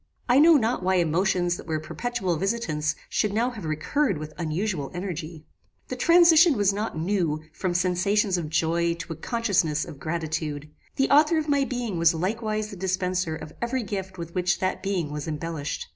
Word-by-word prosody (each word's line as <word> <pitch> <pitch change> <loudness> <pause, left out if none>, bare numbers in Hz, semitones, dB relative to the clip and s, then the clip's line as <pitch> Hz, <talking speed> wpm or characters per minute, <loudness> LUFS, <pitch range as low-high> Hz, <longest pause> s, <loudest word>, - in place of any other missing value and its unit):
I 250 +2 +5
know 325 +2 +7
not 240 -4 +1
why 185 +1 +1
emotions 175 +1 +1
that - - -11
were 160 -1 -1
perpetual 190 +2 -2
visitants 155 -6 -1
should 210 - 0
now 235 +5 +1
have 215 -8 -8
recurred 180 - 0
with 155 0 -7
unusual 170 -2 -2
energy. 170 -4 -5 0.4
The - - -3
transition 335 -3 +6
was 200 -1 +3
not 210 -4 -3
new 165 -3 -1
from 180 +1 -2
sensations 185 +3 +1
of 165 -4 -3
joy 170 +2 +1
to 170 0 -6
a - - -9
consciousness 185 -6 0
of 140 - -10
gratitude. 155 -2 -3 0.2
The 270 - +1
author 300 +3 +5
of 310 -1 -1
my 280 -1 +3
being 240 -9 -3
was 165 0 +4
likewise 215 +4 -2
the - - -7
dispenser 185 -2 -1
of 155 - -9
every 240 +1 -1
gift 190 -2 -5
with 170 -1 -7
which 180 -1 +1
that 185 0 -2
being 185 -6 -2
was 150 0 -5
embellished. 155 -1 -4
185 Hz, 180 wpm, -25 LUFS, 160-220 Hz, 0.4 s, know